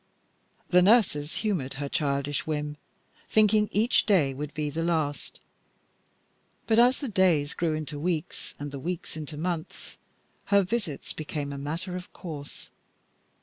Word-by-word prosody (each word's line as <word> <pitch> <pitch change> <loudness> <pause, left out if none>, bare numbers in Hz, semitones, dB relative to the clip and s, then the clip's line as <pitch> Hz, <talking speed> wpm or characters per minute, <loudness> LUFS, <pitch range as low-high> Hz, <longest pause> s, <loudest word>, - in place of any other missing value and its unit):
The 180 0 +6
nurses 180 -8 +3
humored 145 -11 -1
her 140 +1 -3
childish 140 0 -1
whim, 150 -1 -2 0.5
thinking 215 0 +4
each 220 +5 +3
day 165 -10 +4
would 145 +2 -5
be 150 -1 -2
the 160 +3 -2
last; 160 -4 -1 1.3
but 225 0 +4
as 250 +2 +6
the 280 - -2
days 175 -9 +2
grew 165 -2 0
into 155 -1 -4
weeks 165 -1 -3
and 145 0 -5
the 140 - -5
weeks 170 +3 -4
into 155 -1 -6
months, 170 0 -4 0.5
her 200 -1 +4
visits 185 - -3
became 145 -2 -4
a - - -5
matter 165 +6 -4
of 180 0 -7
course. 150 -5 -8
155 Hz, 145 wpm, -27 LUFS, 145-185 Hz, 1.3 s, The